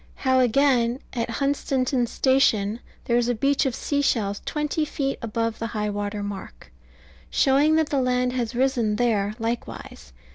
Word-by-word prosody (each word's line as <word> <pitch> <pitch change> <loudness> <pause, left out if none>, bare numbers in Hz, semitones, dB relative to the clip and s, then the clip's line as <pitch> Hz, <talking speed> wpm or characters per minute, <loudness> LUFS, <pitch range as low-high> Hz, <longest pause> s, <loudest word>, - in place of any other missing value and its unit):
How, 260 0 +4
again, 250 -1 +3
at 235 -2 -2
Hunstanton 265 0 0
Station 230 -5 +2 0.3
there 235 - +2
is 240 -1 +1
a 245 - +1
beach 275 +4 +1
of 255 - -2
sea 285 -1 -1
shells 205 -7 0
twenty 300 +1 -1
feet 275 -2 -2
above 230 0 -2
high 215 -2 -2
water 205 0 -3
mark, 205 -1 -8 0.6
showing 285 +3 +3
that 315 -2 +2
the 280 -2 +1
land 250 0 +1
has 245 -1 -2
risen 245 -4 +1
there 215 -3 0
likewise. 230 - -5
245 Hz, 150 wpm, -24 LUFS, 225-270 Hz, 0.6 s, How